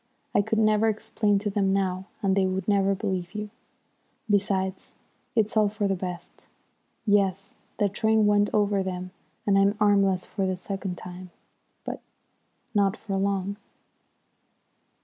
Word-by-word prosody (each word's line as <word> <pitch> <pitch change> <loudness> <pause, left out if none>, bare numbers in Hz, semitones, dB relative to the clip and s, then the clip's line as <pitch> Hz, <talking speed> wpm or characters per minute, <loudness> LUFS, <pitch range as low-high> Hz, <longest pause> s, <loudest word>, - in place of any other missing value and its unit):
I - - +5
could 220 +2 -1
never 215 0 +4
explain 215 -1 0
to 205 +1 -2
them 195 -1 +1
now, 190 -1 -1 0.2
and 190 -1 +3
they 195 -1 +3
would 190 +1 -2
never 195 -1 +3
believe 190 -2 -3
you. 210 0 -4 0.8
Besides, 195 -2 0 0.4
it's 220 -1 +1
all 215 -1 +4
for 210 0 -1
the 195 - +1
best. 180 -1 -6 0.6
Yes, 195 -2 +1 0.2
the 205 - +3
train 220 +2 +2
went 205 0 +4
over 205 -1 +2
them 185 -1 -4 0.3
and 195 -1 +4
I'm 200 +1 +3
armless 195 -3 +3
for 195 -2 -2
the 185 -1 -1
second 190 -1 -4
time. 180 0 -9 0.6
But - - -5 0.7
not 200 -1 +2
for 200 -3 -4
long!" 195 0 -1
200 Hz, 145 wpm, -26 LUFS, 190-210 Hz, 0.8 s, I